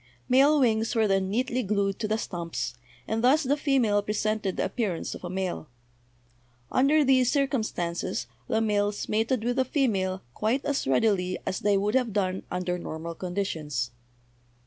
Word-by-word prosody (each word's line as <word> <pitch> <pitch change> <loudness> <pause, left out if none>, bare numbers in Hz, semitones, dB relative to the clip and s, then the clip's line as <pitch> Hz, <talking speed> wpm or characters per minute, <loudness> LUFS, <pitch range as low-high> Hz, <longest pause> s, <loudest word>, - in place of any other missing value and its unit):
Male 275 +4 +5
wings 225 -2 +2
were 220 -1 +3
then 195 -1 +1
neatly 250 +4 0
glued 200 -2 0
to 215 - -1
the 215 +1 0
stumps, 170 - -4 0.3
and 225 +1 -1
thus 290 +6 +5
the 275 +2 +2
female 260 -8 +2
presented 210 -1 -1
the - - +1
appearance 200 -9 -2
of - - -10
a 175 - -4
male. 185 -4 -3 1.0
Under 290 +3 +4
these 255 -2 +4
cir 280 -1 +3
cumstances 175 - -2 0.2
the 220 - +1
males 205 -1 0
mated 225 +2 0
with 245 +2 -1
the 260 - +4
female 195 -9 0
quite 235 +7 0
as 285 - -1
readily 180 - +2
as 190 - -2
they 205 -1 +2
would 205 +2 0
have 250 -5 +1
done 190 -2 0
under 180 0 -2
normal 165 0 -5
condi 185 +3 -2
tions. 150 -9 -3
210 Hz, 170 wpm, -27 LUFS, 185-250 Hz, 1.0 s, Male